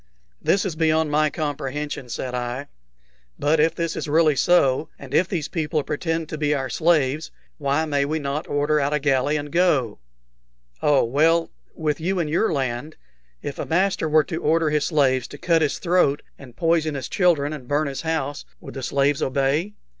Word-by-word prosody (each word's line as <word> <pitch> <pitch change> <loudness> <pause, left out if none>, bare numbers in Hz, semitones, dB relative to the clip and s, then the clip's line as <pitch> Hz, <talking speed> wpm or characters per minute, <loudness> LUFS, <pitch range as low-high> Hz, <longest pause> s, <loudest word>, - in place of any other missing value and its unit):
"This 195 - +2
is 180 -5 -3
beyond 160 -1 +2
my 155 +1 +3
comprehension," 145 -3 -4
said 125 +1 -4
I. 125 +3 -4 0.7
"But 150 +2 +2
if 160 +2 +3
this 165 -1 -2
is - - -4
really 155 0 +3
so, 150 -1 +3
and 135 -1 -11
if 175 +4 +3
these 170 -6 -2
people 155 -3 -1
pretend 160 +2 -2
to 155 - -5
be 150 -1 +1
our 135 -2 -3
slaves, 155 -3 +1 0.3
why 145 +2 +1
may 145 -2 +1
we 155 +2 -1
not 145 0 -3
order 145 +1 +1
out 140 +1 0
a - - +1
galley 140 +1 +1
and 145 0 -6
go?" 150 - +2 0.8
"Oh, 145 -2 +4
well, 160 +7 +2 0.2
with 150 -2 -1
you 190 +3 0
in 170 -3 0
your 170 +8 +1
land, 135 +1 -3 0.5
if 140 - -5
a - - -2
master 180 -1 +1
were 155 0 +5
to 165 -1 -5
order 160 0 +2
his 150 -2 +1
slaves 130 -5 +2
to 145 - -10
cut 165 +1 +2
his 150 - 0
throat 170 -5 +2
and 125 -4 -14
poison 165 -2 +1
his 135 -2 -4
children 155 -6 +2
and 135 -5 -8
burn 145 +3 +1
his 140 -2 -4
house, 155 -3 -2 0.2
would - - -10
the 135 - -6
slaves 140 +2 +1
obey?" 140 +9 0
150 Hz, 190 wpm, -23 LUFS, 140-160 Hz, 0.8 s, were